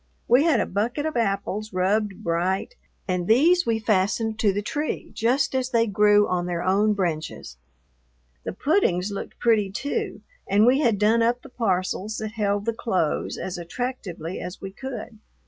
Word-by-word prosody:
We 250 +6 +5
had 305 -8 +4
a - - +1
bucket 235 +9 -2
of 315 - -2
apples 210 -1 -1
rubbed 195 +2 0
bright, 180 - -1 0.3
and 180 -2 -1
these 325 +10 +4
we 230 -1 +2
fastened 215 +1 0
to 210 -3 +3
the 205 +2 -3
tree 295 +8 -3
just 265 +5 +1
as 260 -1 0
they 230 -2 +3
grew 210 0 +4
on 180 -1 -1
their 175 -1 -2
own 200 +3 +3
branches. 165 - -3 0.9
The - - -4
puddings 205 - +1
looked 200 - -6
pretty, 220 -4 +2
too, 275 +9 -3 0.3
and 205 +2 +5
we 255 +3 +4
had 235 -8 +2
done 215 +3 +3
up 240 +2 +1
the 275 - -12
parcels 200 -2 -1
that 215 -1 -4
held 205 -2 -1
the 230 - 0
clothes 185 -9 -1
as 180 -1 -5
attractively 180 -4 -5
as 180 +1 -7
we 195 - -7
could. 235 -1 -7
210 Hz, 170 wpm, -24 LUFS, 190-235 Hz, 0.9 s, We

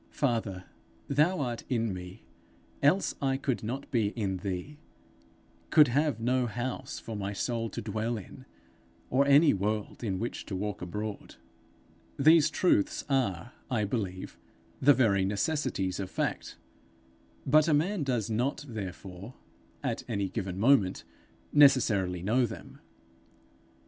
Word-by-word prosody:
Father, 110 -9 -1 0.4
thou 155 +6 +2
art 120 -3 -3
in 115 -5 0
me, 90 +3 -9 0.6
else 170 +8 +3
I 135 -1 +1
could 135 -2 -2
not 125 +6 -5
be 115 -6 +2
in 100 -5 -1
thee, 95 +10 -5 0.9
could 150 -4 +6
have 145 -1 +1
no 125 +2 +1
house 120 +3 -4
for 115 - -7
my 100 0 -3
soul 115 +2 -2
to - - -6
dwell 110 +2 -2
in, 100 - -11 0.7
or 140 +2 +3
any 145 +2 +6
world 105 +4 -2
in 100 -5 -1
which 115 +5 -5
to 100 - -4
walk 105 +1 -3
abroad,' 105 +4 -5 0.8
These 155 +2 +6
truths 140 - +1
are, 120 -6 0 0.2
I 115 -4 0
believe, 100 -4 -4 0.4
the 145 +1 +6
very 105 -6 +3
necessities 100 - -1
of 95 -2 -4
fact, - - -3 0.9
but 155 +3 +5
a - - +3
man 180 +5 0
does 125 -7 -1
not 125 +6 -1
therefore, 100 0 -7 0.5
at - - -2
a 100 -1 -1
given 95 -4 -4
moment, 110 -5 +3 0.5
necessarily 110 -11 +4
know 120 +5 +2
them. - - -10
115 Hz, 135 wpm, -29 LUFS, 100-135 Hz, 0.9 s, could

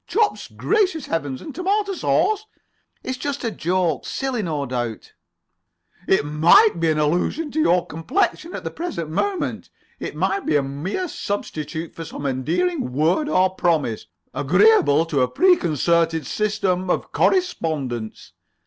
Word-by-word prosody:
Chops! 430 0 0
Gracious 380 -9 0
Heavens! 145 -5 -3
And 300 - -8
tomato 395 +4 0
sauce." 430 +3 +1 0.6
"It's 255 -1 -4
just 285 +1 -3
a 230 - -1
joke. 175 -5 0
Silly, 265 -4 -2
no 155 -7 -2
doubt." 120 -3 -4 0.9
"It 190 - +3
might 165 +6 +5
be 165 -1 +2
an 155 - +1
allusion 175 - 0
to 315 - -2
your 180 - +3
complexion 335 - -1
at - - -6
the - - -4
present 320 - -5
moment. 380 - -2 0.3
It - - -5
might 395 -1 0
be - - +2
a 145 - +3
mere 155 - -3
substitute 160 - -4
for 165 - -7
[Pg - - -10
26]some 140 - -2
endearing 285 - -1
word 165 - +1
or 185 -7 +3
promise, 160 -11 0 0.3
agreeably 165 - +4
to 150 -5 0
a 125 - +3
preconcerted 165 - +2
system 190 -1 -1
of - - -1
correspondence." 150 - -1
175 Hz, 145 wpm, -22 LUFS, -, 0.9 s, might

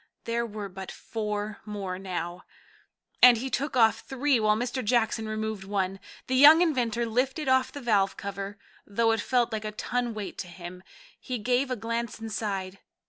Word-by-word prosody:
There 235 0 -1
were 210 -2 -6
but 190 0 -8
four 210 -1 -4
more 195 -3 -5
now, 180 -2 -5 0.8
and 250 -1 +9
he 260 +3 -4
took 275 0 -1
off 225 -2 +5
three 270 -1 +1
while 215 -1 +3
Mr. 245 +3 -2
Jackson 220 -1 +1
removed 215 -2 -3
one. 195 -1 -2 0.3
The 260 - -3
young 300 +6 +9
inventor 240 -7 0
lifted 260 +6 -1
off 260 0 +3
the 285 - -8
valve 205 -5 +2
cover, 200 0 -5 0.3
though 225 +3 +2
it 225 -2 +1
felt 245 0 +1
like 215 -1 -2
a 215 - -3
ton 240 +2 -2
weight 210 -2 -6
to - - -4
him. 175 +1 -9 0.4
He 255 -2 -4
gave 250 +4 +1
a 255 - 0
glance 230 0 -3
inside. 200 -4 -4
220 Hz, 175 wpm, -27 LUFS, 200-245 Hz, 0.8 s, and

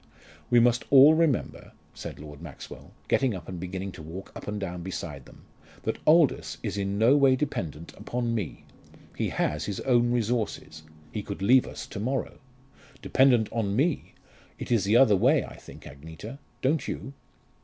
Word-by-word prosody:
"We 120 -1 +5
must 120 0 +3
all 140 +3 +8
remember," 160 -5 0 0.2
said - - -8
Lord 75 0 -11
Maxwell, 85 -5 -10 0.2
getting 130 -6 +2
up 90 - -9
and 90 -2 -6
beginning 95 +2 -5
to 90 - -11
walk 85 +5 -9
up - - -9
and 105 0 -3
down 90 -3 -5
beside 80 -6 -6
them, - - -17 0.4
"that - - -2
Aldous 155 -2 +3
is - - -3
in 100 0 -2
no 115 +6 +5
way 135 -2 +5
dependent 85 - -4
upon 120 -1 -3
me. 105 -8 -4 0.5
He - - -1
has 75 0 -1
his 100 -2 -4
own 120 -2 +3
resources. 115 -9 -2 0.3
He 105 - -3
could 100 -1 -6
leave 125 +5 +5
us - - -7
to 100 - -8
morrow. 130 +5 -3 0.6
Dependent 125 -5 +4
on 105 -3 -1
me! 145 +5 0 0.4
It - - -7
is 110 -5 +3
the 105 +4 +4
other 115 -5 +6
way, 130 +10 +3
I - - -11
think, - - -13
Agneta 80 - -10 0.2
don't 145 +4 +1
you?" 135 - -5
110 Hz, 175 wpm, -27 LUFS, 90-130 Hz, 0.6 s, all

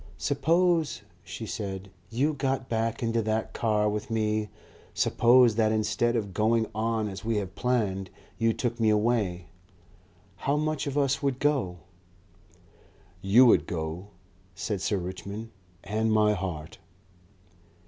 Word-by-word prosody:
"Suppose," 165 +3 +1 0.2
she - - -7
said, 95 -1 -5 0.2
"you 135 +7 +1
got 135 -2 -1
back 115 +1 -1
into 115 0 +1
that 110 0 -2
car 105 -2 +1
with 105 +1 -3
me; 110 -1 0 0.5
suppose 120 -1 +5
that 110 -1 +3
instead 115 +2 +1
of 100 -5 -2
going 110 +3 +2
on 110 0 -1
as 95 -2 -7
we 115 0 0
have 95 -2 -3
planned, 100 -7 -1 0.3
you 115 0 +3
took 120 +1 -3
me 110 -1 +3
away. 105 -5 +1 0.9
How 140 +2 0
much 155 -1 -1
of 140 0 -3
us 140 -1 +1
would 140 -3 0
go?" 135 -12 0 1.4
"You 105 +7 +6
would 120 - +4
go," 80 +3 -4 0.5
said 100 0 -3
Sir 100 - 0
Richmond, 100 +5 -6 0.3
"and 110 +3 0
my 105 -1 +4
heart." 90 -6 -5
110 Hz, 135 wpm, -27 LUFS, 100-125 Hz, 1.4 s, You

